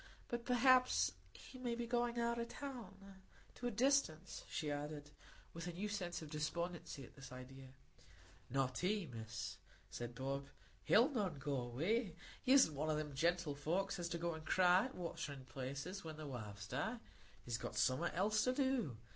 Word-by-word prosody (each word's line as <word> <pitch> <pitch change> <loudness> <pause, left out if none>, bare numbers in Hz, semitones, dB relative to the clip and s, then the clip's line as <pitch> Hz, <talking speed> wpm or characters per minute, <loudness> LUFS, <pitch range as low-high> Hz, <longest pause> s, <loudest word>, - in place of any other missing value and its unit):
But 240 0 -2
perhaps 250 - +5 0.2
he 255 - -12
may 240 -2 -1
be 240 0 -2
going 240 0 +1
out 235 0 +1
of 235 - -1
town—to 200 -4 -8
a - - +2
distance," 235 - +2
she 150 -3 -1
added, 145 0 -4 0.4
with 165 +1 -5
a 175 - -3
new 195 +5 -2
sense 175 -5 -2
of 150 - -9
despondency 160 -1 -2
at - - -16
this 135 -1 -10
idea. 130 +1 -9 0.8
"Not 130 0 +1
he, 200 +1 +1
Miss," 110 -5 -5 0.3
said 120 0 -5
Bob. 135 +2 -2 0.4
"He'll 235 +6 +6
none 205 - 0
go 140 +1 -2
away. 160 - 0 0.3
He 255 - +2
isn't 265 - +8
one 150 +2 -1
o' 155 - +3
them 150 -1 -2
gentlefolks 170 +4 +1
as 170 -1 -2
go 170 0 -1
to 160 - -6
cry 180 +4 +5
at 260 - -6
waterin' 160 -6 -4
places 140 +9 -4
when 160 -2 -6
their 155 - -6
wives 105 -6 -6
die; 220 - -1 0.5
he's 120 -1 -1
got - - -4
summat 130 +11 +2
else 210 +4 +3
to 255 - +3
do. 255 - +1
170 Hz, 170 wpm, -40 LUFS, 140-220 Hz, 0.8 s, isn't